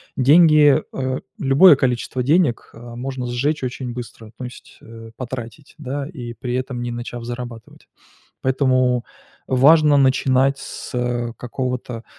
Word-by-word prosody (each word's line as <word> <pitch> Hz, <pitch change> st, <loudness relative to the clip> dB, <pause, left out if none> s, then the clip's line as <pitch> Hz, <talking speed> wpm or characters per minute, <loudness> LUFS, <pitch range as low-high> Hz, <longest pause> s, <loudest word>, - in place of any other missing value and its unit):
деньги, 150 Hz, +1 st, +6 dB
а, 130 Hz, 0 st, -2 dB, 0.2 s
любое 145 Hz, +5 st, +6 dB
количество 125 Hz, -1 st, -1 dB
денег, 145 Hz, -2 st, +1 dB
а, 120 Hz, +1 st, -11 dB
можно 130 Hz, +1 st, -5 dB
сжечь 135 Hz, +5 st, -1 dB
очень 125 Hz, 0 st, -4 dB
быстро, 115 Hz, -2 st, -9 dB
то 130 Hz, -, -7 dB
есть, 125 Hz, 0 st, -11 dB
э, 115 Hz, 0 st, -12 dB
потратить, 130 Hz, +2 st, -8 dB
да, 140 Hz, 0 st, -4 dB
и 125 Hz, -8 st, -8 dB
при 120 Hz, +2 st, -5 dB
этом 130 Hz, -1 st, -3 dB
не 120 Hz, -, -4 dB
начав 120 Hz, 0 st, -6 dB
зарабатывать. 120 Hz, -1 st, -8 dB, 0.5 s
Поэтому 130 Hz, -2 st, +1 dB, 0.4 s
важно 145 Hz, +3 st, +5 dB
начинать 135 Hz, 0 st, +2 dB
с, -, -, -8 dB
э, 120 Hz, -1 st, -2 dB
какого-то, 125 Hz, -2 st, -5 dB
130 Hz, 135 wpm, -20 LUFS, 120-135 Hz, 0.5 s, деньги